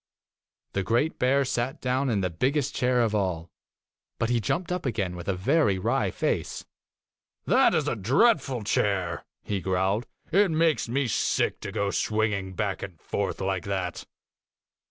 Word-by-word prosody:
The 100 Hz, -, 0 dB
great 120 Hz, -, 0 dB
bear 135 Hz, +2 st, +3 dB
sat 125 Hz, +4 st, -2 dB
down 130 Hz, +2 st, 0 dB
in 105 Hz, -4 st, +1 dB
the 90 Hz, -2 st, -1 dB
biggest 135 Hz, -, 0 dB
chair 125 Hz, -1 st, +2 dB
of 115 Hz, -2 st, +1 dB
all, 90 Hz, -5 st, -1 dB, 0.7 s
but 115 Hz, -, 0 dB
he 120 Hz, -, +3 dB
jumped 170 Hz, -, -1 dB
up 180 Hz, -1 st, -2 dB
again 100 Hz, -8 st, -2 dB
with 85 Hz, -1 st, -8 dB
a 100 Hz, -, +1 dB
very 105 Hz, -, +2 dB
wry 95 Hz, -, +1 dB
face. -, -, -2 dB, 0.4 s
* -, -, -61 dB
That -, -, +4 dB
is -, -, +1 dB
a -, -, 0 dB
dreadful 135 Hz, -, +2 dB
chair,' 100 Hz, -4 st, 0 dB, 0.2 s
he 100 Hz, -2 st, -2 dB
growled. 95 Hz, +5 st, 0 dB, 0.2 s
' -, -, -44 dB
It 200 Hz, +2 st, +4 dB
makes 160 Hz, -5 st, +2 dB
me 140 Hz, +3 st, +1 dB
sick 110 Hz, -, 0 dB
to -, -, -6 dB
go 100 Hz, -1 st, -1 dB
swinging 105 Hz, -3 st, 0 dB
back 100 Hz, -1 st, -2 dB
and 90 Hz, -5 st, -8 dB
forth 100 Hz, +4 st, -3 dB
like 95 Hz, -1 st, -1 dB
that. 95 Hz, -3 st, -3 dB
110 Hz, 170 wpm, -27 LUFS, 95-135 Hz, 0.7 s, That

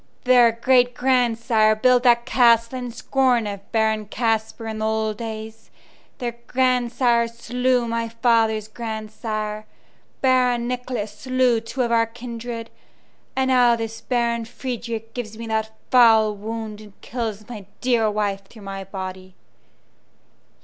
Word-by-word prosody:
Their 245 Hz, -2 st, +6 dB
great 245 Hz, +1 st, +3 dB
grandsire 230 Hz, -4 st, +2 dB
built 250 Hz, +3 st, +4 dB
that 240 Hz, -1 st, +4 dB
castle 235 Hz, +1 st, +3 dB
in 245 Hz, -1 st, -5 dB
scorn 245 Hz, 0 st, +1 dB
of 200 Hz, -1 st, -7 dB
Baron 220 Hz, -2 st, +1 dB
Casper 225 Hz, 0 st, -1 dB
in 220 Hz, -1 st, -4 dB
the 215 Hz, -, -1 dB
old 220 Hz, -1 st, -1 dB
days; 220 Hz, 0 st, -7 dB, 0.5 s
their 240 Hz, -1 st, -4 dB
grandsire 245 Hz, -2 st, +2 dB
slew 245 Hz, +1 st, 0 dB
my 230 Hz, 0 st, -2 dB
father's 225 Hz, -2 st, +1 dB
grandsire; 215 Hz, -1 st, -5 dB, 0.5 s
Baron 250 Hz, -2 st, +2 dB
Nicholas 245 Hz, -4 st, -4 dB
slew 255 Hz, 0 st, +1 dB
two 240 Hz, +3 st, -3 dB
of 235 Hz, -, -1 dB
our 230 Hz, -1 st, +3 dB
kindred; 230 Hz, 0 st, -7 dB, 0.6 s
and 265 Hz, 0 st, +1 dB
now 245 Hz, -2 st, +5 dB
this 225 Hz, -1 st, -5 dB
Baron 235 Hz, -2 st, 0 dB
Frederick 235 Hz, -2 st, -6 dB
gives 220 Hz, -3 st, -6 dB
me 230 Hz, -, -6 dB
that 220 Hz, -1 st, -2 dB, 0.2 s
foul 225 Hz, -4 st, +6 dB
wound 215 Hz, 0 st, -6 dB
and 205 Hz, -2 st, -16 dB
kills 220 Hz, -3 st, -5 dB
my 210 Hz, -5 st, -9 dB
dear 235 Hz, -4 st, +2 dB
wife 205 Hz, -2 st, -2 dB
through 215 Hz, +1 st, -15 dB
my 195 Hz, 0 st, -6 dB
body." 185 Hz, -1 st, -7 dB
230 Hz, 135 wpm, -22 LUFS, 220-245 Hz, 0.6 s, Their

